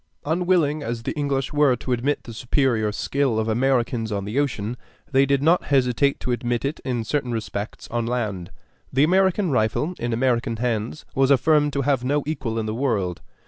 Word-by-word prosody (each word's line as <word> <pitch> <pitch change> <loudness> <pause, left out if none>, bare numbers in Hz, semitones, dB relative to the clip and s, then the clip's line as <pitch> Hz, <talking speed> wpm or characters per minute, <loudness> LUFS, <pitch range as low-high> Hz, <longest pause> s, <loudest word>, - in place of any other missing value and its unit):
Unwilling 160 -2 +1
as 115 -2 -4
the - - -2
English 140 -2 -1
were 145 -3 +4
to 125 - -6
admit 130 +4 0
the 115 - -9
superior 120 -2 +1
skill 135 +2 0
of 110 0 0
Americans 120 -1 +1
on 100 -1 -2
the 110 +7 -1
ocean, 120 -5 -1 0.4
they 135 0 +4
did 140 0 +2
not 170 +4 +3
hesitate 135 0 +2
to 125 - -3
admit 120 +1 -1
it, 140 +3 -2
in 125 -4 -2
certain 125 +1 -1
respects, 110 -2 -5
on 120 -1 -2
land. 105 -8 -2 0.4
The 135 +2 +3
American 190 +1 +3
rifle 125 - +1
in 120 0 -2
American 120 0 +1
hands 115 +2 -2
was 135 0 +2
affirmed 145 +1 +3
to 140 - 0
have 135 -2 +1
no 145 +3 +1
equal 130 -7 -3
in 110 - -1
the 110 - -2
world. 110 -8 -1
125 Hz, 185 wpm, -23 LUFS, 115-145 Hz, 0.4 s, were